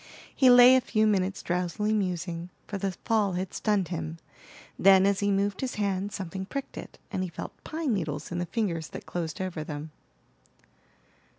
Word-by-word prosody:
He 260 - +6
lay 250 +1 +9
a 260 - +4
few 220 -3 +1
minutes 195 -2 +1
drowsily 180 +5 -1
musing, 180 -3 -2 0.2
for 200 - -5
the 195 0 -1
fall 210 -4 +2
had 180 +1 -3
stunned 205 -6 0
him; 80 0 -4 0.6
then, 190 0 +7
as 200 0 +2
he 205 - +1
moved 200 0 0
his 260 -2 -3
hand 200 -1 -1
something 190 0 -5
pricked 275 +3 -5
it, - - -9
and 190 -3 -2
he 185 - -2
felt 170 - -7
pine 315 -5 -2
needles 155 -6 -3
in 175 - -2
the 175 - -2
fingers 170 -9 -2
that - - -9
closed 165 -3 -4
over 185 -4 -3
them. 150 0 -6
190 Hz, 180 wpm, -28 LUFS, 175-210 Hz, 0.6 s, lay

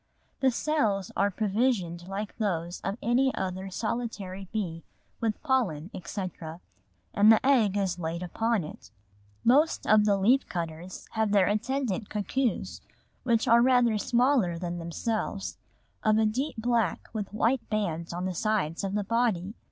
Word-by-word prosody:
The 265 - +4
cells 225 - 0
are 200 - +2
provisioned 195 -4 0
like 200 +2 -5
those 175 -5 -2
of 195 +2 -2
any 255 +3 +3
other 190 +1 -3
solitary 200 -3 -4
bee 175 -7 -3 0.4
with 225 -2 -1
pollen, 210 - 0
etc., 170 -2 -6 0.5
and 210 +2 +6
the 220 - +4
egg 225 -8 +4
is 185 -3 -1
laid 170 +1 -3
upon 225 +3 0
it. 150 - -10 0.5
Most 290 +7 +3
of 210 -1 +5
the 200 -1 +3
leaf 245 +8 +3
cutters 170 +1 -5
have 220 -2 0
their 200 -2 +5
attendant 220 0 -1
cuckoos, 235 +4 -2 0.4
which 235 0 +1
are 235 0 +6
rather 245 -3 +4
smaller 240 -7 +2
than 175 0 -4
themselves, 195 +4 -3 0.4
of 215 0 +3
a 220 - +3
deep 255 +8 -1
black 230 -5 0
with 210 -3 -4
white 230 +4 0
bands 170 -6 -2
on 175 +2 -3
the 185 - -2
sides 190 -4 -1
of 195 0 -2
the 210 - 0
body. 215 -3 0
210 Hz, 150 wpm, -28 LUFS, 185-235 Hz, 0.5 s, and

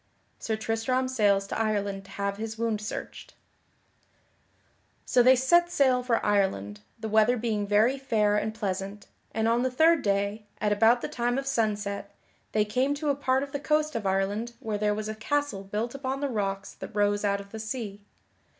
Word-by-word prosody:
[Sidenote: - - -19
Sir 220 -1 -2
Tristram 255 +4 0
sails 205 -6 +2
to 200 - -4
Ireland 200 -3 -1
to 195 - -15
have 200 0 -2
his 220 +1 -5
wound 225 -2 -1
searched] 215 - -7 1.7
So 250 - +4
they 255 +2 +7
set 345 +7 +4
sail 260 -6 +3
for 245 -2 0
Ireland, 190 - 0 0.2
the 220 - -4
weather 220 +3 +4
being 215 -3 -1
very 220 +6 +3
fair 210 -6 +2
and 215 +1 0
pleasant, 200 -1 -4 0.3
and 220 0 0
on 230 +1 +3
the 260 - +1
third 320 +5 +4
day, 200 0 -1
at 210 -1 +1
about 225 +4 +4
the - - -2
time 245 +1 -1
of 275 - -2
sunset, 205 -5 -2 0.4
they 215 -1 +2
came 255 +7 0
to 300 0 -2
a 280 - +2
part 265 -1 +1
of 280 - -7
the 285 - -3
coast 305 +1 +1
of 215 -4 -1
Ireland 200 +5 -1
where 215 -2 -3
there 210 0 +1
was 215 0 -4
a 215 - -3
castle 225 -2 -2
built 210 +4 -3
upon 270 -1 -3
the 285 0 -1
rocks 200 -4 -3
that - - -10
rose 205 0 +2
out 200 -1 +1
of 200 0 -11
the 220 - -6
sea. 215 -3 -5
220 Hz, 195 wpm, -27 LUFS, 205-255 Hz, 1.7 s, they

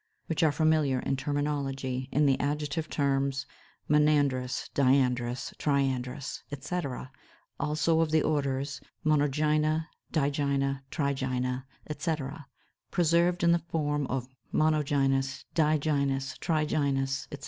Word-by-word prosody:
which 160 0 -1
are 160 -2 +5
familiar 155 -3 +2
in 135 - 0
terminology 135 -2 -2
in 150 +1 +3
the 135 -2 +3
adjective 150 +2 -2
terms 135 -1 0 0.4
monandrous, 145 -4 +2
diandrous, 125 -3 +2
triandrous, 135 -2 -1
etc. 140 -2 -4 0.5
(284); 140 - 0
also 155 +2 +2
of 165 -1 +2
the 155 0 +3
orders, 140 -1 -1 0.2
Monogynia, 155 +1 +2 0.2
Digynia, 140 -2 0
Trigynia, 130 -3 -1 0.2
etc., 150 -1 -3 0.4
preserved 170 +1 +2
in 170 - +5
the 170 0 +3
form 145 -3 0
of 125 -2 -2 0.3
monogynous, 135 -3 +1
digynous, 140 -4 +1
trigynous, 140 -4 0
etc. 145 - -6
140 Hz, 105 wpm, -29 LUFS, 135-155 Hz, 0.5 s, are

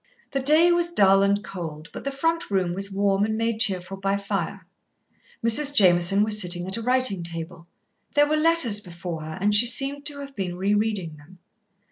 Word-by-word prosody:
The 275 - -2
day 310 +6 +3
was 345 0 +2
dull 195 - +4
and 200 +1 0
cold, 165 -5 -9
but - - -9
the 275 - -2
front 330 +5 -2
room 185 -3 -1
was 195 +2 -3
warm 195 0 0
and 220 +1 -2
made 230 -1 -2
cheerful 195 -2 -1
by 195 +1 -2
fire. 200 -2 -5 0.8
Mrs. 280 +5 +6
Jameson 185 0 +3
was 210 0 +1
sitting 175 0 -1
at 190 - -1
a 230 - -5
writing 250 -5 0
table. 170 0 -6 0.5
There 290 0 +4
were 305 - 0
letters 305 -10 +5
before 170 -3 -7
her, 155 0 -8
and 205 +2 0
she 220 +4 +4
seemed 275 +3 -1
to 290 -1 -5
have 275 -1 -11
been 180 -3 -5
re 195 +3 -1
reading 205 -7 -3
them. 150 +6 -18
200 Hz, 195 wpm, -23 LUFS, 180-255 Hz, 0.8 s, Mrs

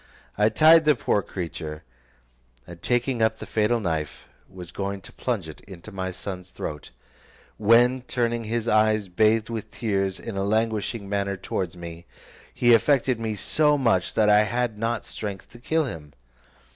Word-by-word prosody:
I 105 +1 +3
tied 160 +4 +6
the 150 -1 +5
poor 105 -3 +1
creature, 80 -5 -6 0.8
and 85 -1 -12
taking 120 +1 0
up 110 0 +2
the - - -8
fatal 110 +2 +1
knife, 80 -8 -3 0.2
was 90 -3 -10
going 100 +1 -4
to - - -14
plunge - - -3
it - - -11
into 95 +2 -11
my 95 -1 -3
son's 90 0 -7
throat, 75 -5 -7 0.7
when 120 +4 +4
turning 120 -2 -1
his 115 +1 -2
eyes 110 -2 +2
bathed 110 +4 +2
with 110 -2 -5
tears, 95 -4 -2
in 115 - -7
a 95 - -1
languishing 110 0 -1
manner, 100 -1 -1
towards 90 -1 -4
me, 85 0 -9 0.4
he 120 -1 +4
affected 130 0 +3
me 110 -1 -2
so 150 +8 +2
much 115 -9 +1
that 110 - +3
I 105 0 +6
had 120 +1 -1
not 115 +2 -2
strength 100 -3 -7
to 120 - -14
kill 160 +5 0
him. 75 - -8
105 Hz, 165 wpm, -25 LUFS, 95-120 Hz, 0.8 s, tied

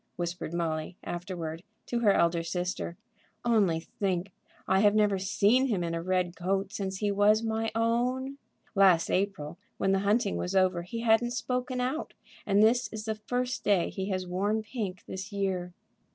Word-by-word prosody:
whispered 175 -1 -4
Molly, 165 0 -2
afterward, 170 -2 -5 0.2
to 240 - -1
her 215 -4 +5
elder 170 -2 +3
sister. 175 0 -3 0.5
"Only 205 -9 +3
think; 185 +2 -2 0.4
I 190 +1 +4
have 205 +1 +4
never 205 -2 +3
seen 205 +7 +3
him 200 -8 0
in 165 -1 -2
a 165 - -2
red 180 0 0
coat 195 +2 -1
since 195 -3 -3
he 205 +1 0
was 210 +2 +4
my 225 0 -1
own. 250 +4 0 0.3
Last 190 -5 +5
April, 180 -5 -1 0.2
when 195 - +1
the 195 - +3
hunting 205 +1 +1
was 180 +2 -3
over, 185 -2 +3
he 205 +7 -5
hadn't 235 +1 +3
spoken 250 +1 -2
out; 260 +6 -2 0.3
and 200 +1 +4
this 240 +3 +4
is 215 -1 -6
the 220 - 0
first 250 +4 -3
day 195 -4 +2
he 190 0 -4
has 185 -1 -1
worn 200 +5 0
pink 205 -6 -5
this 190 +3 -6
year." 190 -3 -2
195 Hz, 170 wpm, -29 LUFS, 180-225 Hz, 0.5 s, her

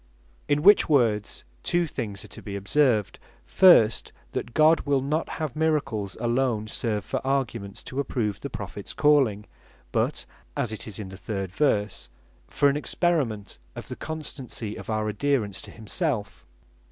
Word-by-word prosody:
In 145 +1 +1
which 205 -1 +7
words 115 -8 +2 0.2
two 175 - +1
things 110 -10 -5
are - - -14
to - - -11
be 100 -2 -6
observed, 110 +1 +1 0.3
First, 145 - +5 0.2
that 120 - -4
God 155 +1 +6
wil 140 -1 +1
not 150 +5 -1
have 155 -5 -3
miracles 140 - 0
alone 120 -2 0
serve 105 -2 -2
for - - -2
arguments, 120 -7 -2
to 130 - -5
approve 115 -7 -1
the - - -4
Prophets - - -6
calling; 135 -9 +3 0.5
but - - 0 0.3
(as 115 - -1
it 110 - -6
is 105 - -6
in 105 -3 -6
the 95 - -9
third 95 -2 -4
verse) 105 -4 0 0.4
for 145 - +2
an 140 +1 +2
experiment 145 - -1 0.2
of - - -8
the - - -5
constancy 135 -8 -5
of - - -9
our 110 -1 0
adherence 105 -2 0
to - - -11
himself. 115 - -3
120 Hz, 155 wpm, -26 LUFS, 105-145 Hz, 0.5 s, which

